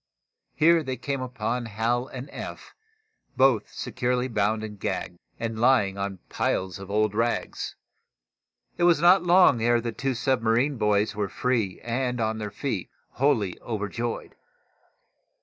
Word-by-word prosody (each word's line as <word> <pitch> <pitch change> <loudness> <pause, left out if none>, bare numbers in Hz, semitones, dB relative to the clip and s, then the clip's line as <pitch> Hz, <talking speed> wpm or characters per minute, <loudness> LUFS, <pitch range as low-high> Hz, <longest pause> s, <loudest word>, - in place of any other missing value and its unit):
Here 165 +2 +5
they 130 -3 -4
came 135 +2 -3
upon 125 -1 -3
Hal 115 +4 -1
and 130 0 -7
Eph, - - -8 0.6
both 130 -4 +3
securely 125 0 -1
bound 110 -1 0
and 105 -2 -7
gagged, 90 -1 -3 0.2
and 115 -1 -3
lying 120 -6 +4
on 100 -1 -3
piles 95 0 -1
of 95 0 -9
old 105 0 +1
rags. 115 +2 -2 1.0
It 175 - +4
was 170 -3 +5
not 175 +3 +6
long 175 -8 +5
ere 120 +1 +3
the 115 0 -3
two 135 +3 -2
submarine 125 +2 +1
boys 105 0 +1
were 105 -2 -1
free 115 -4 -1
and 125 +1 -2
on 110 0 -1
their 105 -1 -4
feet, 105 -3 -4 0.2
wholly 120 -9 +1
overjoyed. 115 +1 -4
115 Hz, 140 wpm, -26 LUFS, 105-130 Hz, 1.0 s, not